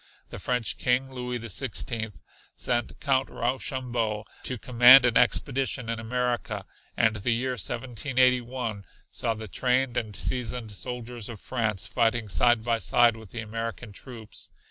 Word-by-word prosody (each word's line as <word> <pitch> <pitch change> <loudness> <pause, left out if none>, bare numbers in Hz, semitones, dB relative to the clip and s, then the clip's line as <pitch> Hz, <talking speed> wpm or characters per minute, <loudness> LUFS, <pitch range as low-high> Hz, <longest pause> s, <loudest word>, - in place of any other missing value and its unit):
The - - -7
French 125 -3 -1
King, 130 +2 +1
Louis 125 -1 -3
the 115 -1 -7
Sixteenth, 110 -1 -2 0.4
sent 120 -2 -1
Count 135 -2 +1
Rochambeau 120 -3 -2 0.2
to 130 - -3
command 125 +3 +8
an 120 -2 +2
expedition 130 -3 +2
in 115 -1 -2
America, 120 -3 -2 0.3
and 110 -1 +3
the 105 +4 -2
year 130 +2 -1
1781 125 -1 0 0.3
saw 115 -2 -1
the 110 0 -7
trained 125 +3 +1
and 105 -3 -3
seasoned 120 -1 -1
soldiers 120 +1 -5
of 115 -4 -8
France 110 -5 -1
fighting 115 -1 +1
side 120 +3 +3
by 115 -1 +1
side 120 +4 +4
with 110 -3 -12
the 115 - -5
American 115 +1 -5
troops. 110 +1 -9
120 Hz, 145 wpm, -27 LUFS, 110-125 Hz, 0.4 s, command